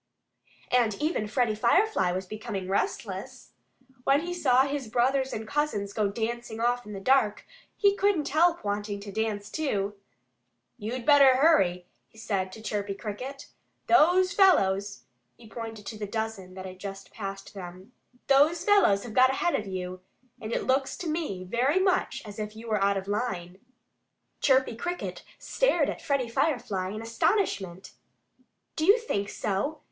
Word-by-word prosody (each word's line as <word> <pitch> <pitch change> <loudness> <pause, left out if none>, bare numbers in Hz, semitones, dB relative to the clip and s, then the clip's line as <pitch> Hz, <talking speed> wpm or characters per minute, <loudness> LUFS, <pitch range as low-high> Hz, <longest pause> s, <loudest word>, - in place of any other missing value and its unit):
And 235 -4 +3
even 300 -8 -1
Freddie 235 0 +1
Firefly 235 - +2
was 185 +1 -3
becoming 210 -1 -5
restless. 200 - -3 0.5
When 275 +3 +3
he 350 +1 -4
saw 265 -7 +4
his 280 -2 -3
brothers 260 +3 +1
and 220 0 -5
cousins 215 -8 -1
go 215 -2 +1
dancing 225 +2 -4
off 245 0 0
in 210 - -7
the 195 - -5
dark 220 0 +2 0.3
he 400 -1 +4
couldn't 395 -7 +1
help 335 -1 +2
wanting 205 0 -2
to 200 0 -8
dance 210 -1 -3
too. 205 -10 -1 0.9
"You'd 235 +3 -4
better 280 -3 +7
hurry!" 195 - +3 0.2
he - - -23
said 195 -4 -2
to 220 - -11
Chirpy 205 -2 -3
Cricket. 250 +7 -7 0.4
"Those 360 +3 +4
fellows 200 - +3 0.2
" 120 - -48
he 230 - -15
pointed 225 -2 -7
to 215 +1 -7
the 210 - -4
dozen 210 -4 -4
that 190 0 -7
had 185 0 -9
just 195 0 -8
passed 195 -2 -7
them 185 +2 -10 0.3
"those 290 +5 +4
fellows 400 - +4
have 235 - -8
got 255 +2 +6
ahead 305 +6 0
of 210 - -1
you. 185 -1 -5 0.4
And 220 0 -5
it - - -1
looks 265 +1 0
to 360 - -5
me 305 - -3
very 245 - +1
much 375 -1 0
as 210 0 -9
if 210 0 -5
you 225 +1 -10
were 210 -3 +1
out 200 0 +2
of 190 0 -5
line." 190 -4 -3 0.8
Chirpy 260 -3 +3
Cricket 350 +9 -4 0.2
stared - - +1
at - - -8
Freddie 275 -4 0
Firefly 230 -8 -1
in 215 +3 -6
astonishment. 225 - -1 0.8
"Do 315 - 0
you 405 +4 +7
think 200 - -2
so?" 215 +10 -2
225 Hz, 160 wpm, -27 LUFS, 200-280 Hz, 0.9 s, better